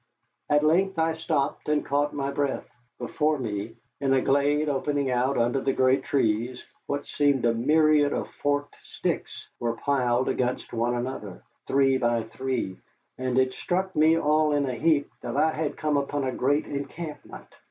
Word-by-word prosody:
At 150 0 +3
length 185 +4 +2
I 160 0 +2
stopped 155 -3 -2
and 150 -1 +1
caught 145 +1 +1
my 140 -1 -2
breath. 140 -1 -2 0.3
Before 150 +5 0
me, 110 -3 -4 0.2
in 135 -1 +2
a 130 - +3
glade 145 +2 +2
opening 140 -1 0
out 125 +2 +1
under 120 +3 +1
great 130 +1 +3
trees, 120 -1 0 0.2
what 140 0 -2
seemed 140 -4 +1
a 115 - +3
myriad 150 +4 +3
of - - -2
forked 145 0 -2
sticks - - -4
were 115 -1 -1
piled 125 -3 +1
against 125 0 -1
one 120 +1 0
another, 120 -6 -5 0.2
three 135 -1 +3
by 120 -2 +1
three, 120 -4 -3 0.4
and 130 -1 -1
it 130 0 +3
struck 190 +1 -2
me 155 +2 +5
all 155 -1 +2
in 145 -1 +1
a 130 - -2
heap 145 +3 +2
that 120 +2 -4
I 160 +2 +3
had 155 -1 -3
come 150 -1 0
upon 140 0 -1
a 130 - -1
great 140 +4 +1
encampment. 145 +3 -7
140 Hz, 165 wpm, -26 LUFS, 125-150 Hz, 0.4 s, me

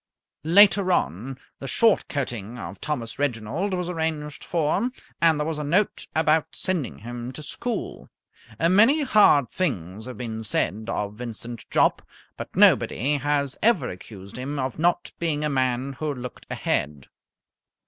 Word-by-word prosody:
Later 200 +1 +6
on, 120 - -1 0.2
the 135 - -6
short 220 - +3
coating 120 -5 -4
of 100 -4 -8
Thomas 130 -7 -4
Reginald 145 - -1
was 180 -1 -2
arranged 160 -4 -3
for, 170 +8 0 0.3
and 165 -2 +4
there 150 - 0
was 160 -1 -3
a - - -2
note 185 +8 0
about 155 0 +2
sending 180 -9 -2
him 120 +2 -6
to 155 - -8
school. 235 +6 -5 0.5
Many 220 - +5
hard 205 - +5
things 110 - -3
have 125 - -7
been 110 -2 -5
said 110 0 -1
of 105 -3 -2
Vincent 115 0 -8
Jopp, - - +3 0.3
but - - -8
nobody 145 +5 +4
has 140 -1 -1
ever 210 - +3
accused 100 +3 -10
him 140 +3 -4
of 130 0 -3
not 175 +1 +1
being 155 -3 -1
a 150 - +1
man 130 0 0
who 155 -1 -1
looked 125 -2 -8
ahead. 70 -1 -1
145 Hz, 150 wpm, -25 LUFS, 120-170 Hz, 0.5 s, Later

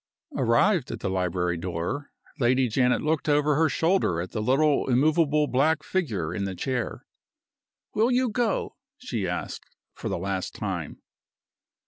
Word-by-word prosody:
Arrived 145 - +2
at - - -5
the - - -1
library 90 -1 0
door, 90 - -4 0.3
Lady 130 +1 +3
Janet 125 +1 +2
looked 155 0 0
over 150 0 +3
her 160 +2 +3
shoulder 165 - +1
at 90 +1 -4
the 110 - -3
little 140 +5 +2
immovable 150 +3 +3
black 150 +3 +1
figure 105 - -2
in 100 - -2
the 95 -1 -4
chair. 125 +5 -3 0.9
"Will 225 +3 +3
you 255 0 +2
go?" 230 -1 -1 0.2
she 115 - -3
asked, 90 0 -5 0.3
for - - -5
the - - -1
last 95 +1 -3
time. - - -5
130 Hz, 145 wpm, -26 LUFS, 95-155 Hz, 0.9 s, Lady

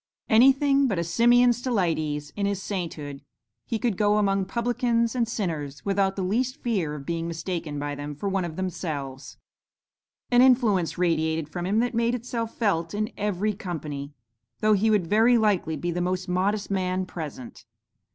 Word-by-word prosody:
Anything 270 +4 +5
but 200 -7 -1
a 170 - 0
Simeon 240 +7 +4
Stylites 165 - -1
in 200 -1 0
his 200 -2 -1
sainthood, 160 -8 -5 0.5
he 230 - -1
could 220 -3 -1
go 210 0 +3
among 195 -2 +1
'publicans 235 0 0
and 240 -3 0
sinners' 155 - -4
without 195 -1 +1
the 195 - -2
least 250 +8 0
fear 190 - -1
of 140 -2 -8
being 165 +1 -2
mistaken 165 -2 -4
by 145 0 -3
them 145 +1 -6
for 200 - -4
one 195 -1 0
of 165 -2 -5
themselves. 150 -7 -5 0.9
An 245 0 +6
influence 225 - +3
radiated 160 -3 0
from 175 +3 -4
him 205 +3 +1
that 245 0 -1
made 235 +1 +1
itself 230 -1 -4
felt 190 -5 0
in 215 +3 -1
every 210 +1 -1
company, 150 -8 -5 0.5
though 215 0 +3
he 210 +2 +3
would 210 -5 +3
very 225 +7 +4
likely 200 -7 +1
be 175 +4 -2
the 175 +1 -2
most 180 +1 -1
modest 195 +3 0
man 185 -1 0
present. 155 -8 -8
190 Hz, 170 wpm, -26 LUFS, 165-225 Hz, 0.9 s, An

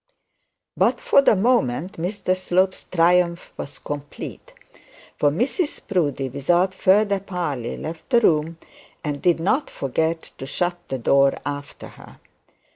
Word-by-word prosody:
But - - +2
for 475 - +4
the 275 - +4
moment 185 - +1
Mr 185 +1 -1
Slope's 185 +1 0
triumph 175 0 +2
was 140 -1 -7
complete; 145 - -7 0.7
for 145 - +4
Mrs 260 - -1
Proudie 145 - 0
without 175 +8 +1
further 200 +1 +3
parley 170 -11 -4
left 160 0 -7
the 240 -3 +5
room, 160 -3 +2 0.5
and 145 -2 -3
did 175 -2 +3
not 255 - +1
forget 160 +5 -1 0.2
to 135 - -6
shut 175 +4 -1
the 135 - -3
door 135 +3 +3
after 145 0 -6
her. - - -15
170 Hz, 130 wpm, -22 LUFS, 145-190 Hz, 0.7 s, the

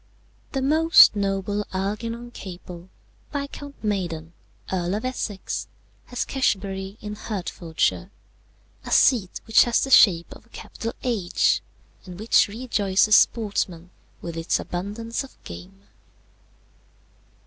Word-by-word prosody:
"The 270 -1 -1
most 315 -3 +6
noble 200 0 -1
Algernon 230 +5 -3
Capel, 180 -3 -10 0.4
Viscount 280 -1 -6
Maiden, 170 -6 -3 0.4
Earl 180 +1 -1
of 215 - -4
Essex, 220 -6 -4 0.4
has 245 - -3
Cashiobury 195 -6 -1
in 210 0 -6
Hertfordshire, 185 -4 -2 0.7
a - - -8
seat 215 -8 +3
which 225 -2 +5
has 240 -1 +2
the 270 - -3
shape 175 -9 +6
of - - -16
a - - -30
capital 230 0 -7
H, 215 -8 +1 0.5
and 180 0 -9
which 220 +1 +4
rejoices 210 -2 +2
sportsmen 185 -6 +1 0.3
with 170 -1 -5
its 165 +1 0
abundance 210 +7 -4
of 270 - -14
game. 90 +3 -11
205 Hz, 115 wpm, -24 LUFS, 180-230 Hz, 0.7 s, most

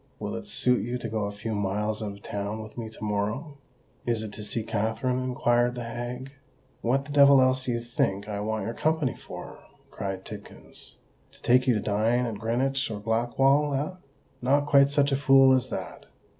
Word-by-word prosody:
"Will - - -4
it - - -7
suit 125 -1 +2
you 120 +2 -2
to 115 - -5
go 110 -1 -2
a 100 - -3
few 105 +2 -5
miles 105 +2 -1
out 105 -2 -3
of 100 - -15
town 105 +2 -4
with 110 - -12
me 115 -2 -5
to 110 - -11
morrow." 110 +8 -2 0.4
"Is 115 -2 -1
it 105 -2 -7
to 105 - -7
see 110 +2 -2
Katherine?" 115 +4 -1
inquired 120 -1 +1
the 120 - -4
hag. 120 +3 -5 0.5
"What 135 +4 +1
the 145 - -9
devil 140 -1 +7
else 130 0 +2
do 125 - 0
you 120 - -2
think 100 -4 -1
I 105 -1 -3
want 110 -1 -2
your 115 - -3
company 155 -1 0
for?" - - -10 0.3
cried 95 -1 -5
Tidkins: 105 -1 -10 0.4
"to - - -20
take 125 +2 +4
you 125 - +4
to - - +1
dine 110 +5 +1
at 110 -4 -4
Greenwich 135 +5 0
or 105 -2 -4
Blackwall—eh? 135 - +1 0.4
Not 140 +3 +3
quite 140 -1 +5
such 145 0 +2
a - - +3
fool 135 -1 +6
as 130 -2 +1
that! - - -6
120 Hz, 200 wpm, -27 LUFS, 110-135 Hz, 0.5 s, devil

